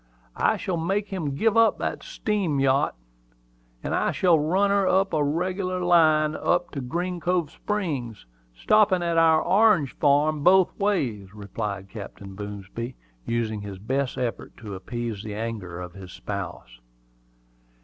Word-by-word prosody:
"I -, -, +2 dB
shall 180 Hz, -3 st, -2 dB
make 195 Hz, +5 st, -1 dB
him 160 Hz, -8 st, -3 dB
give 220 Hz, +7 st, +2 dB
up 230 Hz, 0 st, +5 dB
that -, -, -3 dB
steam 195 Hz, -10 st, -1 dB
yachet; 135 Hz, +1 st, +2 dB, 0.9 s
and -, -, -2 dB
I -, -, +1 dB
shall 175 Hz, -4 st, +3 dB
run 190 Hz, +7 st, +2 dB
her 200 Hz, -1 st, +2 dB
as 190 Hz, +1 st, +4 dB
a 155 Hz, -2 st, +1 dB
reg'lar 185 Hz, +5 st, -1 dB
line 155 Hz, -3 st, +4 dB
up 175 Hz, 0 st, 0 dB
to 140 Hz, -, -4 dB
Green 175 Hz, +8 st, -3 dB
Cove 175 Hz, -3 st, 0 dB
Springs, 145 Hz, -, -3 dB, 0.3 s
stoppin' 205 Hz, -, +3 dB
at 170 Hz, -1 st, +2 dB
our 160 Hz, -1 st, +5 dB
orange 200 Hz, -, +3 dB
farm 145 Hz, +1 st, +3 dB
both 185 Hz, +1 st, +5 dB
ways," 120 Hz, -, -1 dB
replied 100 Hz, -1 st, -5 dB
Captain 100 Hz, -2 st, -9 dB
Boomsby, 105 Hz, +4 st, -6 dB, 0.3 s
using 110 Hz, -3 st, -1 dB
his 100 Hz, -2 st, -7 dB
best 130 Hz, +7 st, -2 dB
efforts 120 Hz, -2 st, -4 dB
to 105 Hz, -3 st, -7 dB
appease 115 Hz, +2 st, -5 dB
the 105 Hz, -1 st, -6 dB
anger 105 Hz, -6 st, -5 dB
of 90 Hz, -1 st, -7 dB
his 95 Hz, -1 st, -10 dB
spouse. -, -, -7 dB
145 Hz, 150 wpm, -25 LUFS, -, 0.9 s, up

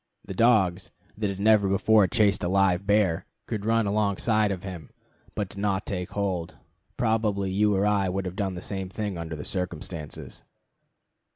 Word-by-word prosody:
The 95 Hz, -, -6 dB
dogs, 95 Hz, -5 st, +3 dB, 0.3 s
that 105 Hz, -1 st, -1 dB
had 100 Hz, -1 st, -5 dB
never 105 Hz, -1 st, +4 dB
before 100 Hz, +1 st, +4 dB
chased 105 Hz, -3 st, +2 dB
a -, -, +1 dB
live 95 Hz, 0 st, +2 dB
bear, 100 Hz, -6 st, +2 dB, 0.2 s
could 105 Hz, -1 st, -4 dB
run 115 Hz, -1 st, +3 dB
alongside 105 Hz, +1 st, +1 dB
of 95 Hz, -2 st, -4 dB
him, 90 Hz, -5 st, -7 dB, 0.5 s
but 100 Hz, -3 st, -2 dB
did 100 Hz, -, -10 dB
not 100 Hz, -1 st, 0 dB
take 90 Hz, -3 st, -4 dB
hold. 95 Hz, -5 st, -2 dB, 0.4 s
Probably 105 Hz, -4 st, 0 dB
you 105 Hz, +1 st, +2 dB
or 95 Hz, +1 st, +2 dB
I 100 Hz, -2 st, +2 dB
would 95 Hz, +1 st, -2 dB
have 90 Hz, 0 st, -5 dB
done 95 Hz, -2 st, -2 dB
the 90 Hz, -, -7 dB
same 95 Hz, -2 st, -4 dB
thing 105 Hz, 0 st, -4 dB
under 85 Hz, -1 st, -5 dB
the 75 Hz, -, -7 dB
circumstances. 85 Hz, -4 st, -5 dB
100 Hz, 175 wpm, -26 LUFS, 90-105 Hz, 0.5 s, never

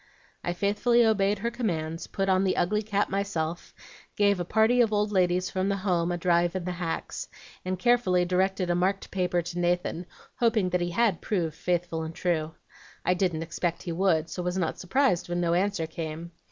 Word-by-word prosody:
"I 175 Hz, -, -1 dB
faithfully 210 Hz, +6 st, +2 dB
obeyed 205 Hz, -2 st, +2 dB
her 235 Hz, +4 st, -2 dB
commands, 165 Hz, -9 st, -3 dB
put 195 Hz, 0 st, -2 dB
on 190 Hz, 0 st, +3 dB
the 190 Hz, -, +1 dB
ugly 210 Hz, +4 st, +1 dB
cap 205 Hz, -1 st, 0 dB
myself, 175 Hz, -4 st, -2 dB, 0.4 s
gave 200 Hz, -2 st, +3 dB
a -, -, 0 dB
party 220 Hz, +6 st, +3 dB
of 225 Hz, -2 st, +3 dB
old 210 Hz, 0 st, +1 dB
ladies 180 Hz, -1 st, +1 dB
from 190 Hz, +1 st, 0 dB
the 200 Hz, -, +1 dB
home 175 Hz, -2 st, +1 dB
a 175 Hz, -, -1 dB
drive 175 Hz, 0 st, +2 dB
in 185 Hz, -, -2 dB
the 180 Hz, -, -2 dB
hacks, 175 Hz, -2 st, -4 dB, 0.4 s
and 185 Hz, 0 st, -2 dB
carefully 185 Hz, -5 st, +3 dB
directed 185 Hz, 0 st, +1 dB
a -, -, +3 dB
marked 190 Hz, +3 st, 0 dB
paper 180 Hz, -2 st, 0 dB
to 175 Hz, +1 st, -5 dB
Nathan, 175 Hz, 0 st, -1 dB, 0.3 s
hoping 225 Hz, -6 st, +2 dB
that 180 Hz, 0 st, +1 dB
he 175 Hz, -, -1 dB
HAD 205 Hz, -1 st, +1 dB
proved 170 Hz, -7 st, -1 dB
'faithful 175 Hz, -1 st, -1 dB
and 160 Hz, 0 st, -6 dB
true.' 160 Hz, -3 st, -1 dB, 0.5 s
I 180 Hz, -, +4 dB
didn't 175 Hz, -3 st, 0 dB
expect 170 Hz, +1 st, -3 dB
he 175 Hz, -, -4 dB
would, 165 Hz, -2 st, +2 dB
so 180 Hz, -, -4 dB
was 180 Hz, +1 st, -2 dB
not 175 Hz, -4 st, -1 dB
surprised 185 Hz, -3 st, +1 dB
when 175 Hz, 0 st, -1 dB
no 170 Hz, -1 st, +1 dB
answer 185 Hz, -1 st, +1 dB
came. 160 Hz, +1 st, -6 dB
180 Hz, 195 wpm, -27 LUFS, 175-200 Hz, 0.5 s, I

